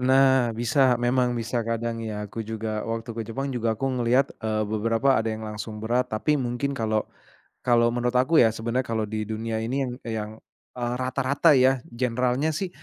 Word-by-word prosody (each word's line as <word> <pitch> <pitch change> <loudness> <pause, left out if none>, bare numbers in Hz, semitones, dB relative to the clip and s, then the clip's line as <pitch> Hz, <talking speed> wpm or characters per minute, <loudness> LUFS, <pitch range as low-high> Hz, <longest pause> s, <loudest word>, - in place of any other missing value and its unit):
Nah 130 -2 +4
bisa. 125 +3 +3
Memang 125 0 +2
bisa 120 +1 -2
kadang 115 0 -2
ya 105 -2 -4
aku 115 +3 -7
juga 110 -1 -3
waktu 115 0 -4
ke 115 - -2
Jepang 135 +4 -3
juga 115 -3 0
aku 135 - -2
ngelihat, 125 +3 +2
eee, 110 -1 -1
beberapa 115 +4 +2
ada 115 - -1
yang 110 - -8
langsung 105 0 -6
berat 120 +3 +1
tapi 145 +7 +1
mungkin 125 +2 -2
kalau 110 -2 0 0.6
kalau 120 -1 +4
menurut 120 0 0
aku 130 +2 +5
ya, 115 - +4
sebenarnya 115 +3 -2
kalau 110 -3 -2
di 110 +1 -3
dunia 110 +1 -4
ini 130 +3 -1
yang 120 - -4
yang, 110 -2 -3 0.5
eee, 120 0 -2
rata-rata 135 +4 +3
ya 130 0 +4
generalnya 125 +4 0
sih, 180 +5 -3
120 Hz, 180 wpm, -25 LUFS, 110-130 Hz, 0.6 s, aku